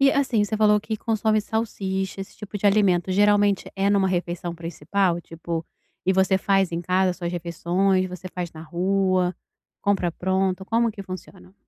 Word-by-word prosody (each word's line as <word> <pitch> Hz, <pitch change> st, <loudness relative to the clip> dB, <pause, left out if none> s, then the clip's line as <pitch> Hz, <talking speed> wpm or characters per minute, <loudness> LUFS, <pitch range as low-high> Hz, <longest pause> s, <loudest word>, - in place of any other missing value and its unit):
E 275 Hz, 0 st, +6 dB
assim, 265 Hz, -6 st, +2 dB
você 215 Hz, +1 st, -2 dB
falou 210 Hz, -1 st, +4 dB
que 220 Hz, +1 st, -4 dB
consome 220 Hz, -1 st, +1 dB
salsicha, 195 Hz, -3 st, -3 dB
esse 195 Hz, -, -9 dB
tipo 210 Hz, -1 st, -7 dB
de 205 Hz, -, +1 dB
alimento, 195 Hz, -3 st, +3 dB
geralmente 205 Hz, 0 st, +3 dB
é 195 Hz, +1 st, +2 dB
numa 195 Hz, -2 st, +3 dB
refeição 175 Hz, -1 st, -2 dB
principal? 170 Hz, +2 st, -1 dB
Tipo, 165 Hz, 0 st, -5 dB, 0.4 s
e 190 Hz, -, +3 dB
você 190 Hz, 0 st, +3 dB
faz 195 Hz, -2 st, +2 dB
em 170 Hz, -, -1 dB
casa 185 Hz, +1 st, +2 dB
suas 175 Hz, -1 st, -4 dB
refeições, 180 Hz, +2 st, 0 dB
você 180 Hz, 0 st, -8 dB
faz 175 Hz, -1 st, -5 dB
na 160 Hz, 0 st, -9 dB
rua, 185 Hz, +1 st, +1 dB, 0.5 s
compra 195 Hz, -3 st, +1 dB
pronto, 190 Hz, +2 st, -1 dB
como 230 Hz, +3 st, +2 dB
que 205 Hz, -2 st, -8 dB
funciona? 185 Hz, 0 st, -10 dB
190 Hz, 170 wpm, -24 LUFS, 180-205 Hz, 0.5 s, E